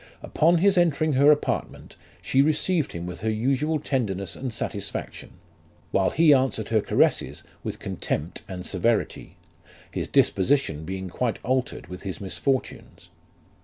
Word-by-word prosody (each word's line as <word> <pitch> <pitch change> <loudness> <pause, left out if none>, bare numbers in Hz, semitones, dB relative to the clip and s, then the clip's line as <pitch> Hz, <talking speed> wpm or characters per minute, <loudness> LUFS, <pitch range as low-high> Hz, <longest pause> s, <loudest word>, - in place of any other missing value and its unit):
Upon 170 +3 +3
his 190 +1 +4
entering 155 -2 +2
her 140 +3 +6
apartment, 150 - -2 0.3
she 135 - +3
received 155 +2 +1
him 85 0 -5
with 90 -1 -6
her 110 - 0
usual 135 +8 +1
tenderness 100 - -2
and 130 -2 -4
satisfaction; 105 -3 -5 0.6
while 95 -1 +2
he 160 -2 +5
answered 130 -5 +1
her 110 -1 +3
caresses - - +1 0.2
with - - -4
contempt 80 +4 -4
and 90 -1 -6
severity; 110 +4 -1 0.5
his - - -3
disposition 95 - +2
being 95 +1 -4
quite 115 +6 -2
altered 130 +1 -1
with 90 0 -9
his 95 -3 -5
misfortunes. 130 +7 -3
125 Hz, 135 wpm, -25 LUFS, 95-145 Hz, 0.6 s, her